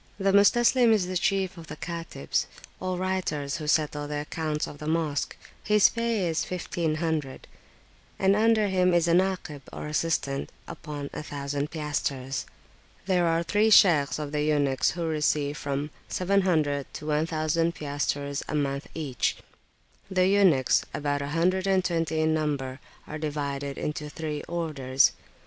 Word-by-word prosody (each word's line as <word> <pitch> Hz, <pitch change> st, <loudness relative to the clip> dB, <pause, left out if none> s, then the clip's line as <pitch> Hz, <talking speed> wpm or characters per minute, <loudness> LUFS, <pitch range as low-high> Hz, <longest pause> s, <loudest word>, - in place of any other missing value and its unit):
The 195 Hz, -1 st, +2 dB
Mustaslim 240 Hz, +4 st, +5 dB
is 205 Hz, -4 st, +2 dB
the 185 Hz, +1 st, -4 dB
chief 190 Hz, 0 st, 0 dB
of 165 Hz, -, -11 dB
the 150 Hz, -, -7 dB
Katibs, 165 Hz, +1 st, -3 dB, 0.3 s
or 185 Hz, -1 st, -2 dB
writers 180 Hz, -7 st, -2 dB
who 155 Hz, -1 st, -6 dB
settle 150 Hz, -1 st, +1 dB
the 150 Hz, 0 st, -3 dB
[p.372]accounts 155 Hz, -2 st, -1 dB
of 145 Hz, -, -10 dB
the 150 Hz, -, -6 dB
Mosque; 155 Hz, -3 st, -1 dB, 0.3 s
his 210 Hz, 0 st, +5 dB
pay 230 Hz, -5 st, 0 dB
is 165 Hz, -1 st, 0 dB
1500, 160 Hz, -5 st, -2 dB, 0.7 s
and 195 Hz, +1 st, +3 dB
under 220 Hz, 0 st, +3 dB
him 185 Hz, -2 st, +2 dB
is 170 Hz, -1 st, +3 dB
a 170 Hz, -, +3 dB
Nakib 180 Hz, -5 st, 0 dB
or -, -, -6 dB
assistant 150 Hz, -3 st, -1 dB, 0.2 s
upon 145 Hz, -2 st, -7 dB
1000 145 Hz, -1 st, -4 dB
piastres. 140 Hz, -4 st, -3 dB, 0.6 s
There 180 Hz, -3 st, +2 dB
are 165 Hz, +1 st, +2 dB
three 205 Hz, +6 st, +2 dB
Shaykhs 165 Hz, -9 st, +5 dB
of 150 Hz, -1 st, -5 dB
the 150 Hz, 0 st, -1 dB
eunuchs 145 Hz, -3 st, +2 dB
who 170 Hz, -, -1 dB
receive 150 Hz, -2 st, 0 dB
from 145 Hz, +1 st, -3 dB, 0.2 s
700 175 Hz, -7 st, +1 dB
to -, -, -7 dB
1000 155 Hz, +2 st, 0 dB
piastres 145 Hz, -1 st, -2 dB
a -, -, -2 dB
month 140 Hz, -1 st, -1 dB
each. 145 Hz, -6 st, -1 dB, 0.7 s
The 185 Hz, -1 st, +2 dB
eunuchs, 190 Hz, -10 st, +4 dB
about 145 Hz, -1 st, -1 dB
a 140 Hz, -, -3 dB
hundred 180 Hz, +5 st, +1 dB
and 190 Hz, -1 st, +2 dB
twenty 165 Hz, -3 st, 0 dB
in 155 Hz, 0 st, +2 dB
number, 140 Hz, -4 st, -2 dB, 0.3 s
are 155 Hz, -, -6 dB
divided 140 Hz, -2 st, -3 dB
into 150 Hz, 0 st, -4 dB
three 150 Hz, -1 st, -4 dB
orders. 140 Hz, -6 st, +2 dB
155 Hz, 150 wpm, -27 LUFS, 145-180 Hz, 0.7 s, Mustaslim